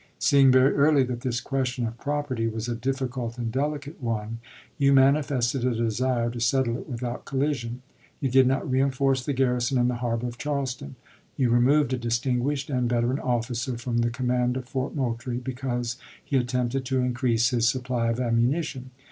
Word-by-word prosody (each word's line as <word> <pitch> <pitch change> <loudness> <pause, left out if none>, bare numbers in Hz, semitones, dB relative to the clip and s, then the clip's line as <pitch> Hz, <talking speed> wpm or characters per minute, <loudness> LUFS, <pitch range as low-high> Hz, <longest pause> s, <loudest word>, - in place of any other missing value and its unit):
Seeing 135 -2 +5
very 130 +2 +5
early 145 -1 +4
that 125 -2 -4
this 120 -2 -1
question 130 -3 -2
of 115 +1 -6
property 145 -5 -2
was 110 +1 -4
a 120 - -1
difficult 125 -1 -3
and 115 -2 -3
delicate 145 +3 -3
one, 115 -1 -3 0.4
you 140 0 +4
manifested 135 -2 +3
a 125 -2 +1
desire 120 +1 0
to 120 - -6
settle 120 0 +1
it 130 - -7
without 120 -1 -4
collision. 130 -3 -2 0.4
You 135 -3 -1
did 130 0 +5
not 135 +1 0
reenforce 135 0 +1
the 145 - -1
garrison 125 -1 +1
in 120 0 +3
the 125 - -2
harbor 115 -1 -1
of 120 -1 -6
Charleston. 135 - -3 0.4
You 125 -3 +2
removed 130 +3 +3
a 130 - -1
distinguished 125 +4 -1
and 125 -2 0
veteran 120 +2 +1
officer 120 0 -2
from 120 0 -2
the 120 0 +2
command 125 0 0
of 130 - -5
Fort 130 0 -3
Moultrie 120 -2 -2
because 125 -1 -3 0.3
he 140 - -2
attempted 125 0 0
to 130 0 0
increase 120 -2 +1
his 120 -1 +3
supply 125 -2 -1
of 115 +1 -1
ammunition. 130 +3 0
125 Hz, 175 wpm, -26 LUFS, 120-135 Hz, 0.4 s, Seeing